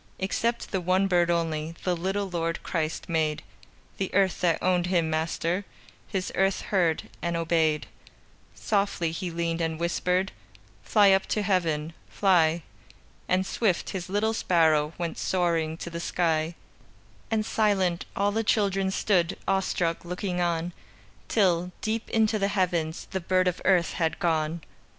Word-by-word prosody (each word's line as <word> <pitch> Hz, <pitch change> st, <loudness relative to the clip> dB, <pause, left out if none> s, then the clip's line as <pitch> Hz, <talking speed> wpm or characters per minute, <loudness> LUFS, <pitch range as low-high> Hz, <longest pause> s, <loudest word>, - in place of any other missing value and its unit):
Except 230 Hz, +5 st, -1 dB
the 190 Hz, -, 0 dB
one 185 Hz, +2 st, +2 dB
bird 175 Hz, -2 st, +2 dB
only 165 Hz, -1 st, -1 dB
The 180 Hz, -1 st, +1 dB
little 195 Hz, +4 st, -1 dB
Lord 165 Hz, -2 st, -2 dB
Christ 160 Hz, -2 st, -2 dB
made; 160 Hz, -3 st, 0 dB, 0.5 s
The 195 Hz, -, -2 dB
earth 195 Hz, -2 st, +2 dB
that 170 Hz, -3 st, +3 dB
owned 180 Hz, -1 st, +1 dB
Him 170 Hz, -3 st, +1 dB
Master, 165 Hz, +4 st, -1 dB, 0.4 s
His 190 Hz, -3 st, -3 dB
earth 195 Hz, 0 st, +1 dB
heard 175 Hz, -5 st, +1 dB, 0.2 s
and 170 Hz, 0 st, -1 dB
obeyed. 160 Hz, -2 st, +1 dB, 0.7 s
Softly 200 Hz, -5 st, 0 dB
He 175 Hz, +2 st, -4 dB
leaned 170 Hz, 0 st, -2 dB
and 160 Hz, -1 st, -1 dB
whispered: 180 Hz, +2 st, 0 dB, 0.5 s
"Fly 205 Hz, -2 st, +5 dB
up 190 Hz, 0 st, +3 dB
to 210 Hz, -, 0 dB
Heaven! 165 Hz, -5 st, 0 dB, 0.2 s
Fly!" 170 Hz, -4 st, +3 dB, 0.6 s
And 185 Hz, +1 st, +2 dB
swift, 190 Hz, -3 st, 0 dB
His 185 Hz, -2 st, -5 dB
little 210 Hz, +3 st, +1 dB
sparrow 160 Hz, -6 st, +2 dB
Went 170 Hz, -2 st, -3 dB
soaring 165 Hz, -3 st, 0 dB
to 170 Hz, -, -7 dB
the 170 Hz, -, -4 dB
sky, 165 Hz, -1 st, 0 dB, 0.7 s
And 220 Hz, -1 st, 0 dB
silent, 195 Hz, -6 st, +1 dB
all 200 Hz, +1 st, +1 dB
the 225 Hz, +2 st, 0 dB
children 195 Hz, -3 st, +1 dB
Stood, 190 Hz, -2 st, +1 dB
awestruck, 185 Hz, -3 st, 0 dB
looking 180 Hz, +1 st, -3 dB
on, 170 Hz, 0 st, -1 dB, 0.5 s
Till, 180 Hz, -4 st, +2 dB
deep 220 Hz, +1 st, -2 dB
into 220 Hz, -1 st, +2 dB
the 200 Hz, -, +2 dB
heavens, 175 Hz, -5 st, -1 dB
The 190 Hz, -1 st, -2 dB
bird 185 Hz, +1 st, +2 dB
of 180 Hz, -, -1 dB
earth 180 Hz, -3 st, +3 dB
had 165 Hz, -2 st, 0 dB
gone. 160 Hz, -1 st, 0 dB
175 Hz, 145 wpm, -27 LUFS, 165-195 Hz, 0.7 s, Fly